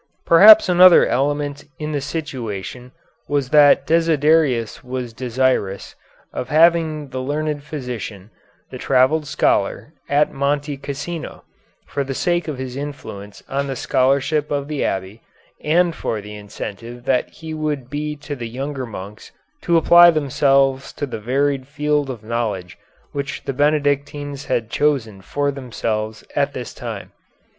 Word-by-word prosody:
Perhaps 210 +6 +8
another 180 0 +7
element 145 +2 -1
in 155 0 -4
the 145 -2 -2
situation 125 - -5 0.4
was 140 -3 -1
that 145 -2 +6
Desiderius 155 -7 +2
was 125 -2 -5
desirous 125 -5 -1 0.4
of 125 - -5
having 160 -2 +3
the 130 0 -4
learned 150 +2 -2
physician, 120 -9 -7 0.4
the - - -8
travelled 145 +4 +2
scholar, - - 0 0.2
at 145 +1 +2
Monte 145 +1 -1
Cassino, 145 +4 -6 0.4
for 140 - -3
the 135 0 -5
sake 175 +3 0
of 150 -4 -4
his 130 -1 -6
influence 130 -8 -8
on 140 +1 -2
the 135 - -3
scholarship 140 +4 +1
of 140 -1 -2
the 150 -2 -2
abbey, 95 +3 -3 0.4
and 170 +2 +2
for 110 - -3
the 105 +1 -9
incentive 105 +3 -8
that 130 -2 +1
he 160 -1 -9
would 150 -5 -3
be 150 +2 -4
to 145 0 -7
the 120 -3 -6
younger 135 +1 -5
monks 105 -1 -9 0.3
to 170 -2 +2
apply 175 +1 +7
themselves 140 -3 +2
to 145 - -3
the 125 -5 -6
varied 135 +3 0
field 150 -1 -1
of 120 -4 -7
knowledge 110 -6 -3 0.4
which 140 -1 -5
the 135 - -3
Benedictines 145 0 0
had 115 -1 -2
chosen 125 -10 0
for 145 +8 -1
themselves 110 -5 -4
at - - +1
this - - -6
time. - - -7
140 Hz, 140 wpm, -20 LUFS, 125-150 Hz, 0.4 s, Perhaps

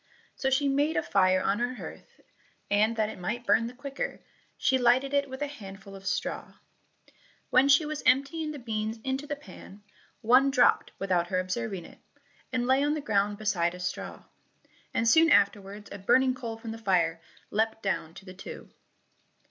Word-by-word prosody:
So 265 - 0
she 275 +2 +2
made 285 +3 +1
a - - +1
fire 185 -1 +3
on 200 +3 +1
her 245 +1 -1
hearth, - - -11 0.5
and 215 +3 +3
that 215 -1 0
it - - -9
might 235 +7 -3
burn 230 0 +3
the 245 - -9
quicker, 275 +1 -5 0.4
she 260 -1 +2
lighted 255 +3 +3
it 280 -1 +1
with 265 +2 -5
a - - -1
handful 195 -7 -10
of 195 0 -10
straw. - - -3 1.0
When 265 +2 +5
she 285 +3 +5
was 305 0 -4
emptying 280 +5 +2
the 300 - -5
beans 220 -3 -3
into 265 +2 -3
the 290 - -2
pan, 210 -8 -13 0.4
one 255 +5 +5
dropped 255 -3 +3
without 180 -3 0
her 185 0 0
observing 185 -1 -3
it, - - -15 0.5
and 250 -2 0
lay 260 +2 +3
on 295 +1 +1
the - - -2
ground 205 -5 0
beside 180 -5 0
a - - -10
straw, 175 -1 -5 0.7
and 230 - 0
soon 325 +7 +6
afterwards 205 -2 +2
a - - -7
burning 255 +7 +3
coal 235 -3 -6
from 225 0 -7
the 225 - -7
fire 170 -6 +1 0.3
leapt 220 +1 0
down 175 -4 -2
to 195 - -12
the 185 - -10
two. 185 - -10
230 Hz, 185 wpm, -28 LUFS, 195-270 Hz, 1.0 s, soon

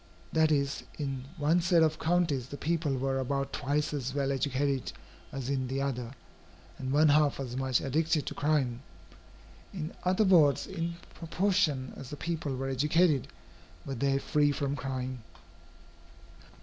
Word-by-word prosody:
That 160 -1 +4
is, 140 -1 +1 0.2
in 135 -3 -3
one 155 +4 +3
set 170 -1 +4
of 155 -1 +1
counties, 160 -7 +1
the 145 - -7
people 155 -4 0
were 135 +1 0
about 140 +1 -2
twice 150 +3 -1
as 135 -2 -3
well 140 -1 +1
educated 135 0 0 0.4
as 135 -2 -5
in 135 -2 -1
the 135 +2 -2
other, 125 -2 -3 0.6
and 130 0 -3
one 150 +2 +5
half 145 -1 +3
as 125 -3 -4
much 130 -1 +1
addicted 155 +2 +1
to - - -4
crime. 140 -5 0 0.9
In 160 -4 -5
other 185 +4 +3
words, 160 -7 +5
in 170 -2 -4 0.2
proportion 165 -6 0
as 135 - -9
the 145 - -7
people 155 -5 -3
were 135 +1 -3
educated, 150 +2 +2 0.6
were 135 - -4
they 135 +2 +1
free 145 +1 +2
from 140 -1 -1
crime. 130 -1 -4
140 Hz, 150 wpm, -30 LUFS, 135-155 Hz, 0.9 s, one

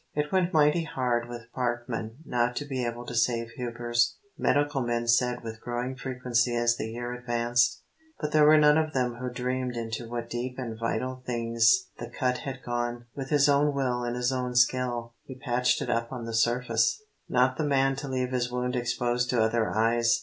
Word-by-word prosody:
"It 150 0 -1
went 185 -2 +2
mighty 155 0 +3
hard 120 -5 -1
with 120 -1 -9
Parkman 120 +1 -3
not 120 -1 0
to 145 - -3
be 130 -3 -3
able 120 0 -4
to - - -6
save 115 0 +1
Hubers," 120 0 -1 0.2
medical 145 -1 +1
men 120 -1 -1
said 120 +1 +2
with 110 -1 -7
growing 120 +2 -3
frequency 125 -2 0
as 120 0 +2
the 110 - -4
year 120 +2 -5
advanced. 120 0 +1 0.4
But 150 -1 -3
there 150 -1 +5
were 155 +1 +7
none 150 +1 +6
of 155 -1 -1
them 125 -2 0
who 125 +1 -4
dreamed 125 0 -2
into 115 0 -4
what 120 -1 -4
deep 120 +2 -4
and 120 -4 -4
vital 130 +3 -2
things 115 +8 +2
the - - -6
cut 125 -2 -1
had 135 -1 -6
gone. 120 0 -3
With 135 -1 -5
his 145 -1 +4
own 145 0 +3
will 125 -3 0
and 120 0 -2
his 125 +1 0
own 125 -1 -2
skill 125 -2 +1
he 130 - -9
patched 125 -1 +1
it - - -5
up 115 0 -1
on 125 -3 -5
the 115 - -5
surface, 120 - +2 0.3
not 130 +1 +2
the 155 - 0
man 135 -2 +2
to 140 - -5
leave 130 -1 -2
his 125 -1 -1
wound 125 0 -1
exposed 125 0 0
to 120 -3 +3
other 110 0 +1
eyes. 115 +2 +2
125 Hz, 200 wpm, -28 LUFS, 120-130 Hz, 0.4 s, were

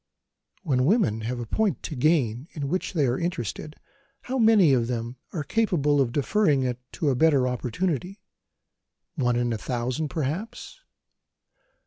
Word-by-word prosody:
When 130 -7 +1
women 165 - +2
have 120 +3 -3
a 120 - -4
point 195 - -1
to 155 - -5
gain 130 -3 +1
in 140 -3 -4
which 185 +4 -2
they 155 -6 +2
are 125 0 0
interested, 155 - -4 0.5
how 260 +1 -2
many 215 - +5
of 120 -3 +2
them 120 0 -4
are 155 - -3
capable 150 -6 +1
of 125 -3 0
deferring 145 - +2
it 125 -1 -2
to 150 -4 0
a - - 0
better 140 -2 +3
opportunity? 165 - -2 0.9
One 125 -6 0
in 120 -1 0
a 110 - -4
thousand, 125 +6 -2
perhaps. 170 - -4
140 Hz, 150 wpm, -25 LUFS, 125-175 Hz, 0.9 s, many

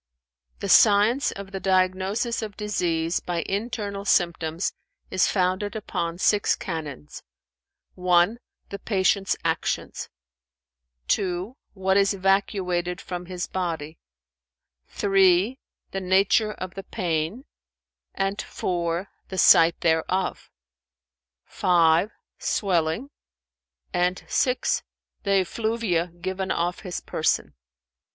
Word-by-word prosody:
"The - - -2
science 215 +6 +5
of 195 0 -9
the 195 - -4
diagnosis 190 +5 +1
of 210 -2 -6
disease 175 -5 0
by 175 -2 -3
internal 200 -1 -3
symptoms 170 -2 +1 0.4
is 185 - +3
founded 190 +2 0
upon 170 -5 -3
six 205 +2 +3
canons: 150 - -6 0.7
(1) 180 +4 +3 0.3
the 200 - -6
patient's 195 -1 +1
actions; 165 -2 -2 1.0
(2) 190 +4 -1 0.2
what 190 0 +1
is 200 0 +3
evacuated 185 -2 0
from 180 -1 -6
his 180 -1 -4
body; 165 -4 -4 0.9
(3) 195 +4 +3 0.3
the 195 - -3
nature 195 +3 +3
of 185 -2 -7
the 195 - -6
pain; 175 - -2 0.7
and 195 +1 -1
(4) 175 +1 -2 0.2
the 190 - -5
site 165 -1 +6
thereof; 170 +3 0 1.0
(5) 170 +2 +3 0.3
swelling; 180 - 0 0.8
and 180 0 0
(6) 250 -1 +1 0.4
the 195 -2 +3
effluvia 215 -3 -1
given 185 +2 -5
off 175 +1 -1
his 185 -3 -5
person." 115 - 0
185 Hz, 100 wpm, -25 LUFS, 175-200 Hz, 1.0 s, site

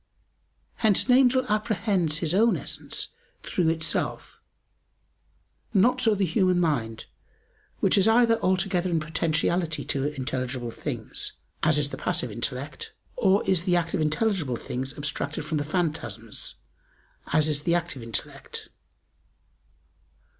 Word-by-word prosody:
Hence 215 -4 +3
an 250 - +5
angel 260 0 +4
apprehends 205 -7 +1
his 160 0 -1
own 225 +4 +4
essence - - -2 0.3
through 170 -3 +1
itself: 165 0 -1 1.4
not 245 +6 +4
so 225 -4 +4
the 200 -1 +1
human 185 +1 +2
mind, 120 -10 -1 0.8
which - - +4
is 195 - +4
either 230 0 +5
altogether 185 -1 +1
in 165 -2 +1
potentiality 160 +1 0
to 135 0 -1
intelligible 130 -3 -3
things - - -5 0.3
as 155 -1 +3
is 145 -1 0
the - - -5
passive 125 - 0
intellect 125 +6 -4 0.2
or 200 -5 +2
is 185 -3 +2
the 180 - +3
act 170 -1 0
of 185 - 0
intelligible 155 - +1
things 130 +3 -4
abstracted 145 0 -3
from 155 -1 -1
the - - -1
phantasms 155 - -2 0.7
as 155 0 +3
is 150 -2 +1
the 170 +3 +2
active 170 -7 -2
intellect. 115 -2 -6
165 Hz, 130 wpm, -26 LUFS, 145-195 Hz, 1.4 s, an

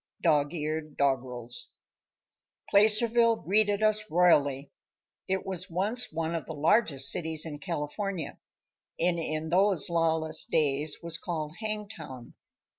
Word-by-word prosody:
Dog 150 -3 +2
eared 155 -1 -4
Doggerels. 125 -3 -2 1.0
Placerville 225 +3 +4
greeted 205 +1 0
us 215 0 +1
royally. 145 -5 +2 0.6
It 190 0 -2
was 185 0 -4
once 210 +8 0
one 165 +1 -3
of 165 - -4
the 160 - -6
largest 155 - +3
cities 160 -2 -2
in 150 -2 -7
California, 175 +3 -4 0.6
and 170 0 +1
in 155 0 -3
those 185 -2 +2
lawless 160 -1 +3
days 150 0 0
was 165 -1 -3
called 160 -2 -5
Hangtown. 205 - -7
165 Hz, 115 wpm, -28 LUFS, 150-200 Hz, 1.0 s, Placerville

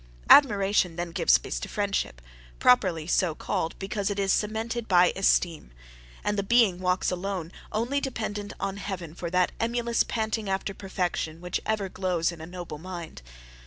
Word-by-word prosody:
Admiration 200 - +5
then 175 0 -4
gives 65 - +4
place - - -5
to - - -6
friendship, 200 - -2 0.3
properly 185 -11 +3
so 170 -1 +1
called, 165 - -2
because 195 +1 -2
it 205 - -3
is 195 -1 +2
cemented 225 +2 -2
by 180 -1 +5
esteem; 175 - +1 0.5
and 210 0 0
the - - +3
being 200 -3 +3
walks 185 0 +1
alone 180 -2 -3 0.2
only 245 +6 0
dependent 210 -6 -4
on 195 0 -3
heaven 185 -5 -5
for 170 0 -5
that 180 +1 +2
emulous 235 0 0
panting 220 -2 -1
after 195 +1 -2
perfection 180 -4 -3
which 180 0 -3
ever 215 -3 0
glows 180 -3 -1
in 170 -2 -10
a 160 - -7
noble 175 -4 -7
mind. 175 - -8
190 Hz, 160 wpm, -27 LUFS, 175-210 Hz, 0.5 s, Admiration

